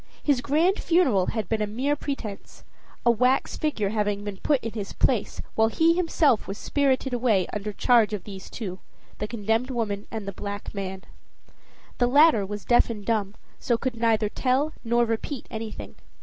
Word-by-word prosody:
His 280 -4 +2
grand 320 +8 +2
funeral 270 - +3
had 220 -5 -2
been 220 +2 -1
a 210 - 0
mere 260 +8 0
pretense: 245 -9 -6 0.4
a 235 - +7
wax 250 +4 +2
figure 225 -10 -1
having 205 -1 -1
been 205 -2 -5
put 285 +6 +1
in 230 - -3
his 210 -3 -5
place, - - 0
while 220 0 +3
he 325 +8 +3
himself 325 -8 +2
was 195 - -5
spirited 270 -1 0
away 230 -7 +2
under 210 0 -3
charge 230 0 +3
of 210 -4 -4
these 195 -2 -9
two, 190 -5 -6 0.4
the 210 - -2
condemned 225 +3 -1
woman 215 -5 -2
and 220 -3 -6
the - - -2
black 205 +1 -6
man. 190 -2 -5 1.0
The 245 - +4
latter 280 -6 +5
was 205 0 -6
deaf 240 0 +4
and 210 -3 -6
dumb, 215 -3 0 0.2
so 235 - +1
could 255 +1 -3
neither 225 -2 +2
tell 265 +7 0
nor 235 0 +2
repeat 230 +4 -3
anything. 220 -2 -6
225 Hz, 180 wpm, -25 LUFS, 205-260 Hz, 1.0 s, a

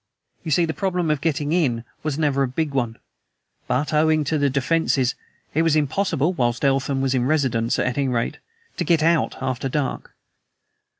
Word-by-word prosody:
You - - -5
see, 170 +3 +3
the 160 - -3
problem 180 -4 -1
of 150 -2 -1
getting 150 -2 -1
IN 130 -10 +1 0.2
was 150 -2 -2
never 145 -3 +1
a 135 - +2
big 145 +3 -2
one. 120 -4 -1 0.7
But 145 +4 0
owing 155 0 +3
to 155 +2 0
the 145 -1 +2
'defenses' 140 -2 +1 0.4
it 160 - +2
was 165 -2 +3
impossible 155 +2 +1
(whilst 120 -3 0
Eltham 135 0 +1
was 135 -1 +1
in 125 -1 +1
residence 130 -6 +1
at 125 - 0
any 140 - +1
rate) 120 -2 -1 0.4
to - - 0
get 165 -3 +2
OUT 165 0 +2
after 130 0 -2
dark. 140 0 -3
145 Hz, 180 wpm, -22 LUFS, 130-160 Hz, 0.7 s, see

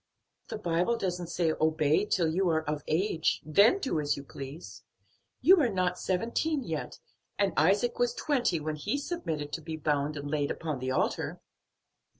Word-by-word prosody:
"The - - -5
Bible 180 +3 0
doesn't 180 -4 -3
say 170 -1 0
obey 155 +3 +2
till 180 -5 +1
you 185 +1 +2
are 160 -1 +1
of 150 -1 -2
age, 165 -1 +1
then 200 - +5
do 270 - -1
as 145 -1 0
you 140 - -7
please. 140 +4 -9 0.6
You 370 -1 +7
are 250 - +3
not 180 -3 0
seventeen 235 - -1
yet, 160 -8 -4 0.4
and 200 -3 +1
Isaac 200 +10 +2
was 245 0 +1
twenty 250 - +1
when 155 0 -3
he 150 - -1
submitted 165 - -4
to 165 - -3
be 160 0 -5
bound 150 0 0
and 145 0 -5
laid 145 -1 0
upon 155 -5 -3
the 130 +1 -3
altar." 130 - -1
165 Hz, 170 wpm, -29 LUFS, 150-210 Hz, 0.6 s, You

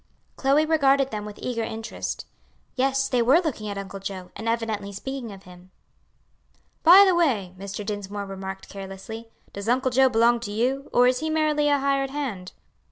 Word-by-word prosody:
Chloe 280 +3 +3
regarded 275 -4 +3
them 210 -1 -4
with 210 -1 -9
eager 240 -2 -3
interest; 225 0 -5 0.5
yes, 270 +1 +1
they 250 -3 +1
were 260 +8 +5
looking 265 - -3
at 200 - -5
Uncle 195 0 -6
Joe, 190 -2 -7
and 230 - -3
evidently 220 -3 -2
speaking 250 +3 -6
of 195 -1 -12
him. 180 0 -15 1.1
"By 365 +4 +9
the 380 - +4
way," 240 - +1
Mr. 200 +2 -6
Dinsmore 205 -1 -4
remarked 190 0 -7
carelessly, 195 +4 -8 0.2
"does 200 +2 -4
Uncle 260 +1 +2
Joe 265 +1 +5
belong 235 0 +3
to 210 -3 -6
you? 255 +6 -1
or 245 - +5
is 250 0 +3
he 315 - -2
merely 305 -1 +1
a 285 - +4
hired 275 0 0
hand?" 250 -11 -4
230 Hz, 175 wpm, -25 LUFS, 200-275 Hz, 1.1 s, By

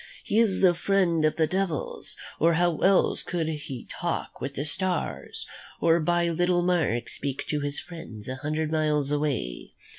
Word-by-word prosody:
He 215 - +1
is 215 -5 +3
the 185 -2 +6
friend 175 -3 +2
of 155 - +2
the 160 - +3
devils, 185 -2 -2 0.2
or 165 +2 +4
how 175 -1 +2
else 195 0 +3
could 170 -3 -2
he 145 -5 -5
talk - - -4
with 135 +2 -4
the 140 - -2
stars, 185 +4 -2 0.3
or 165 0 +4
by 175 +1 +2
little 175 +1 +2
marks 160 -10 +1
speak 140 -1 -3
to 150 - +1
his 145 0 -3
friends 120 -12 -9
a 130 0 -4
hundred 155 +2 -2
miles 150 -3 +1
away? 145 - -2
160 Hz, 170 wpm, -27 LUFS, 145-175 Hz, 0.3 s, the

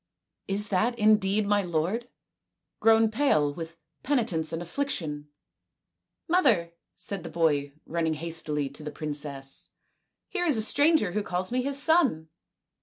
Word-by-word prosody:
" - - -58
Is 205 +1 -1
that 225 +5 +1
indeed 210 -1 +3
my 205 0 +2
lord, 180 +7 -2 0.7
grown 225 0 +4
pale 155 - +2
with 165 +1 -8 0.2
penitence 225 - 0
and 165 - -3
affliction? 170 - -4 0.3
" - - -58
" - - -59 0.2
Mother," 245 - +2 0.2
said 185 +1 -4
the 165 - -8
boy, 145 -4 0
running 160 -1 -1
hastily 155 -2 -2
to 140 +3 -11
the 150 - -5
princess, 145 -3 -5 0.3
" - - -55
here 355 -3 -2
is 290 -7 +3
a 220 - +2
stranger 285 - +3
who 210 +3 -1
calls 185 0 -3
me 255 +1 +1
his 275 +2 +2
son." 280 - +3
185 Hz, 155 wpm, -27 LUFS, 160-235 Hz, 0.7 s, grown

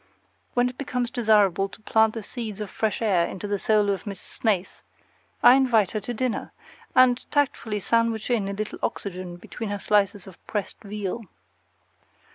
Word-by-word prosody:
When 245 0 +4
it 250 0 -7
becomes 250 -3 -2
desirable 205 -5 +3
to 195 - -13
plant 220 0 +3
the 225 - -4
seeds 215 -2 -6
of 210 -2 -5
fresh 220 0 -1
air 185 -6 +3
in - - -6
the 205 +1 -2
soul 210 -1 +3
of 195 +2 -4
Miss 200 -2 -5
Snaith, 200 -5 -2 0.6
I 245 - +10
invite 245 -7 +3
her 215 - -1
to 210 +4 -6
dinner, 245 0 -2 0.4
and 255 -1 +5
tactfully 260 -7 0
sandwich 230 +2 +1
in 215 -5 +1
a 200 - -3
little 210 +1 -4
oxygen 185 -2 -4
between 220 +5 -6
her 205 - -2
slices 200 -1 +1
of 190 -3 -14
pressed 205 -3 -4
veal. 210 +2 -4
215 Hz, 170 wpm, -25 LUFS, 200-235 Hz, 0.6 s, I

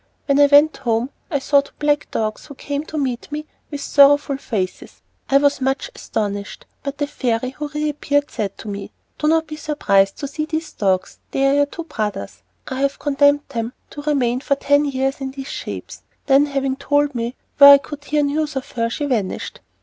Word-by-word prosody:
When 280 0 +2
I 285 - +7
went 290 +2 +5
home, 240 0 -1 0.2
I 290 - +1
saw 280 +1 +3
two 280 - -17
black 295 0 +1
dogs 215 -1 -3
who 285 - -10
came 285 +2 -4
to 315 - -6
meet 260 -2 -2
me 300 +1 -4 0.2
with 290 -2 -5
sorrowful 285 0 +4
faces. 195 -9 -4 0.3
I 275 - +6
was 285 -1 +2
much 270 - -1
astonished, 205 -1 -4 0.2
but 280 0 -5
the 290 - 0
fairy 255 -4 -2
who 295 +2 -5
reappeared 290 -1 -1
said 205 -4 -3
to - - -10
me, 200 -1 -6 0.3
"Do 300 - 0
not 320 +1 +3
be 305 0 -8
surprised 200 -11 +1
to 285 - -4
see 305 +2 -3
these 315 +1 -4
dogs; 190 -2 -1
they 270 - 0
are 275 - +4
your 285 0 +4
two 335 - -7
brothers. 210 - -4 0.3
I 260 +1 -3
have 280 0 0
condemned 285 0 +3
them 235 -2 -3 0.2
to 290 - -7
remain 260 -5 +1
for 280 +1 0
ten 285 +1 +2
years 270 0 -1
in 270 - -3
these 270 +1 -8
shapes." - - -7 0.2
Then 280 +1 +4
having 275 -1 -1
told 290 +1 +1
me 235 +1 -3 0.2
where 280 0 +12
I - - +5
could 290 +1 -9
hear 295 0 +1
news 295 +1 -1
of 265 - -5
her, 230 -1 -1
she 290 +5 -3
vanished. 225 -9 -2
280 Hz, 205 wpm, -20 LUFS, 245-290 Hz, 0.3 s, where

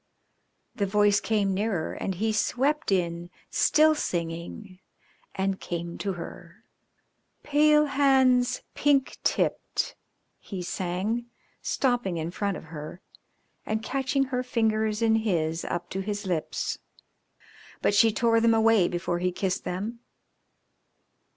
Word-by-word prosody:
"_ - - -18
The 200 - +1
voice 205 +1 +4
came 205 -3 +1
nearer 195 -4 -1
and 190 - -3
he 220 +4 0
swept 270 +6 0
in, 175 -2 0 0.2
still 310 +1 +4
singing, 175 - -4 0.6
and 195 0 -1
came 170 -1 -5
to 200 -2 -2
her. 170 0 -10 0.8
"Pale 300 +1 +4
hands, 265 -3 +3
pink 280 -2 +2
tipped," - - 0 0.4
he 190 -3 -6
sang, 190 +7 -2 0.3
stopping 245 -9 0
in 165 +1 -3
front 200 +1 -2
of - - -10
her 155 +3 -7 0.6
and 220 0 -2
catching 270 +2 0
her 255 -2 -2
fingers 220 -3 0
in 225 -1 +4
his 170 -7 0
up 175 0 -3
to 190 - -3
his 205 +1 -3
lips, 175 -4 -2 1.0
but - - +3
she 225 +2 +5
tore 230 +1 +2
them 230 0 +4
away 220 -4 +4
before 175 0 -2
he 180 +1 0
kissed 190 +1 -2
them. 210 +6 -4
205 Hz, 125 wpm, -27 LUFS, 180-240 Hz, 1.0 s, she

